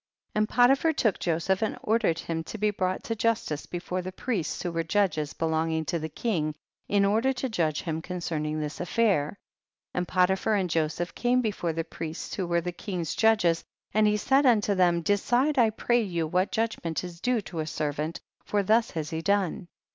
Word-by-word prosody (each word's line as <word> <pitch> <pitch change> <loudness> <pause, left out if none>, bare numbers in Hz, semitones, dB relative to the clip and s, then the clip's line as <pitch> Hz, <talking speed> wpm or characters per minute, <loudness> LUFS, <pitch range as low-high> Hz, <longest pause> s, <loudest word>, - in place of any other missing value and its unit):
69. 215 - 0
And 215 - +1
Potiphar 270 +6 +4
took 225 -8 +1
Joseph 175 +3 0
and 220 - -1
ordered 215 -7 +2
him 165 -1 -3
to 220 - -6
be 210 0 +1
brought 185 -2 -2
to 225 - -2
justice 220 -10 -1
before 180 +1 -3
the 185 +1 -5
priests, 195 -3 -3
who 175 - -2
were 165 0 -1
judges 165 -4 0
belonging 160 0 0
to 170 +3 -1
the 160 0 -4
king, 155 -6 -1 0.3
in 200 -1 +3
order 225 +6 +2
to 265 +1 -2
judge 160 -8 0
him 160 -1 -3
concerning 160 -4 -3
this 150 -1 -4
aifair. 200 -7 +2
70. - - -9 0.6
And 180 0 -1
Potiphar 190 +4 +2
and 185 -4 0
Joseph 160 +2 -1
came 250 +1 +2
before 185 -6 -1
the 165 +1 -2
priests 165 0 -6
who 185 -3 -2
were 170 0 +1
the 180 +1 -3
king's 175 -2 -4
judges, 210 -7 +3 0.3
and 215 +1 +4
he 210 0 +3
said 270 +5 +3
unto 210 -4 +4
them, 175 -3 +3
decide 245 - +2
I 230 -2 +5
pray 240 +2 +1
you 170 -6 -1
what 180 +5 0
judg 225 -1 -1
ment 165 0 -2
is 175 -1 -8
due 245 -2 +1
to 175 -4 -7
a 155 - -2
servant, 150 +1 -2 0.2
for 205 -1 0
thus 225 +3 +3
has 155 -2 -3
he 160 0 -2
done. 200 -1 0
185 Hz, 200 wpm, -27 LUFS, 165-220 Hz, 0.6 s, I